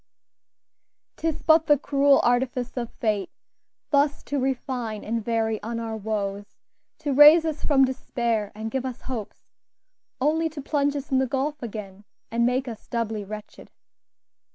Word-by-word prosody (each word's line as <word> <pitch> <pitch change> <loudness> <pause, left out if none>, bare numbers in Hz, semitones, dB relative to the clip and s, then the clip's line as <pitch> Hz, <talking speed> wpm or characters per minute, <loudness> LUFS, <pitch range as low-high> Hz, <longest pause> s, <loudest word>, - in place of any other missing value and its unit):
"'Tis 325 -1 -2
but 315 -1 +5
the 295 -1 +6
cruel 280 0 +3
artifice 245 0 0
of 240 -2 -3
fate, 210 -4 -1 0.6
Thus 285 0 +2
to 285 - -2
refine 255 -4 -2
and 230 +1 -2
vary 225 -1 0
on 230 +2 -4
our 225 -1 -4
woes, 205 -1 -4 0.4
To 290 -3 -1
raise 300 +4 +8
us 315 -2 -3
from 270 -3 +4
despair 235 -5 -2
and 220 +1 -5
give 265 +1 -1
us 255 -2 -5
hopes, 235 -6 -7 0.7
Only 320 +4 +1
to 310 -1 -9
plunge 285 -1 0
us 285 0 -5
in 260 - +3
the 265 - +1
gulf 280 +4 -2
again, 210 -4 -7 0.3
And 235 +1 +2
make 255 +2 0
us 225 -3 -8
doubly 225 -3 -2
wretched." 210 +1 -9
250 Hz, 155 wpm, -25 LUFS, 220-285 Hz, 0.7 s, raise